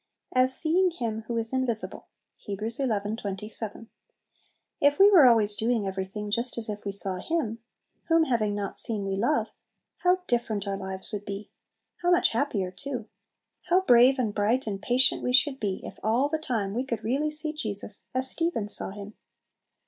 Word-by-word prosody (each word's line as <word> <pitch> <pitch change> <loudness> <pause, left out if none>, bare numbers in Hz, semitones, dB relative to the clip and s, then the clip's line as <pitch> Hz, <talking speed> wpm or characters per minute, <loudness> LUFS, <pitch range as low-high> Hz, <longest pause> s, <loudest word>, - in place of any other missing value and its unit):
"As 255 +1 +5
seeing 360 +4 +4
Him 225 -9 -5
who 235 - -3
is 225 +2 0
invisible." 255 -4 +1 0.4
Heb. 205 +2 -4
xi. 265 +3 -1
27. 210 0 -4 0.9
If 285 0 +3
we 400 +1 +7
were 325 -9 +7
always 215 -3 +5
doing 225 -1 -1
everything 195 +2 -5
just 235 +3 -1
as 225 -2 +1
if 210 0 -6
we 200 - -2
saw 195 -1 +1
Him, 230 - -3 0.5
whom 330 -1 +3
having 220 -7 0
not 200 -1 -4
seen 210 -3 +2
we 195 0 -2
love, 240 +10 0 0.5
how 365 +1 +1
different 220 - -2
our 200 - -2
lives 190 +1 -4
would 205 -1 -4
be! 200 +1 -7 0.5
How 350 - +1
much 355 0 +3
happier 225 -7 -2
too! 240 +3 -7 0.6
How 360 +2 +4
brave, 250 -4 +5
and 230 -5 -1
bright, 220 +6 0
and 200 -3 -5
patient 250 +4 +2
we 250 - -2
should 270 +1 +3
be, 200 -3 -3
if - - -10
all 235 +6 +1
the 315 +1 -2
time 225 -10 -3
we 245 +4 -2
could 230 -5 -5
really 275 +7 0
see 305 0 -1
Jesus 210 -7 0
as 260 +1 +2
Stephen 330 -9 -1
saw - - +2
Him! 205 +1 -9
230 Hz, 180 wpm, -26 LUFS, 205-265 Hz, 0.9 s, we